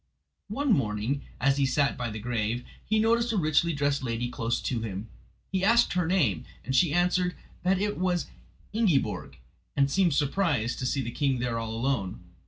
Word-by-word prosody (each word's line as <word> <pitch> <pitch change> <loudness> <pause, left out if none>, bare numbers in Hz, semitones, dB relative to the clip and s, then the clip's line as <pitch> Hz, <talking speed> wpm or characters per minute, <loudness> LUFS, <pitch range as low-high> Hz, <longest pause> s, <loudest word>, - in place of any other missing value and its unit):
One 265 +4 +1
morning, 115 - 0 0.2
as 135 +2 +3
he 140 - +3
sat 140 +2 +2
by 120 -1 -3
the 110 - -5
grave, 115 +1 -2 0.2
he 215 - +1
noticed 230 +2 +3
a - - +1
richly 160 0 +3
dressed 145 -2 0
lady 120 -1 -2
close 115 -1 -1
to 120 -3 -2
him. 105 -1 -5 0.4
He 190 0 0
asked 235 +4 +4
her 180 -2 +1
name 145 - +2 0.2
and 130 +2 -1
she 165 +2 +4
answered 180 +2 +2 0.3
that 185 +1 +2
it 205 -1 -1
was 180 -2 +1 0.5
Ingiborg, 210 -11 0 0.4
and 140 0 +3
seemed 180 -4 +3
surprised 145 - +1
to 130 - -1
see 135 +1 0
the 120 - -4
king 135 0 +1
there 120 -1 -1
all 110 -1 -4
alone. 115 -7 -1
140 Hz, 185 wpm, -28 LUFS, 120-180 Hz, 0.5 s, asked